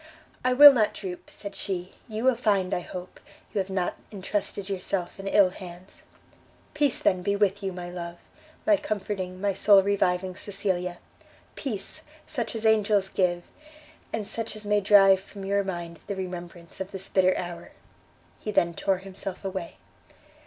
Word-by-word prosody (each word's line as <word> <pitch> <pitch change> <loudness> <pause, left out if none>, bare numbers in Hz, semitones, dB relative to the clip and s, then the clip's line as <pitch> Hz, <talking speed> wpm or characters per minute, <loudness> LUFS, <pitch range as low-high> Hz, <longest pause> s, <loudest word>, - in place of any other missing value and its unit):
"I 255 0 +3
will 290 +2 +11
not 220 -5 +2
droop," 185 -3 -7
said 200 -1 -7
she; 185 -2 -4
"you 220 0 -4
will 260 0 +5
find, 200 -5 +1
I - - +1
hope, 180 +1 -8 0.3
you 210 - 0
have 190 0 -2
not 190 -2 -1
intrusted 200 0 -3
yourself 190 -2 -3
in 195 - -6
ill 195 -2 +5
hands." 180 0 -11 0.7
"Peace 290 -4 +2
then 185 -1 +2
be 200 +2 0
with 200 0 +1
you, 195 -1 -2
my 180 -1 -6
love! 170 -1 -6 0.5
my 315 -2 +5
comforting, 190 -5 -3
my 200 0 +1
soul 200 0 +6
reviving 185 -2 +1
Cecilia! 185 -3 -3 0.6
Peace, 265 +4 -5 0.2
such 235 -2 -3
as 225 0 -3
angels 210 -3 +3
give, 175 -2 +1 0.7
and 215 -2 -3
such 225 0 -4
as 215 0 -9
may 205 0 +2
drive 195 -1 +7
from 195 0 -10
your 200 +1 +1
mind 175 -3 -5
the 200 - -2
remembrance 175 -2 -7
of 190 - -4
this 195 -1 -6
bitter 185 -1 +3
hour!" 175 -1 -6 0.7
He - - -6
then 170 -4 +2
tore 195 +2 +1
himself 195 0 -7
away. 190 -3 -4
195 Hz, 165 wpm, -27 LUFS, 180-205 Hz, 0.7 s, will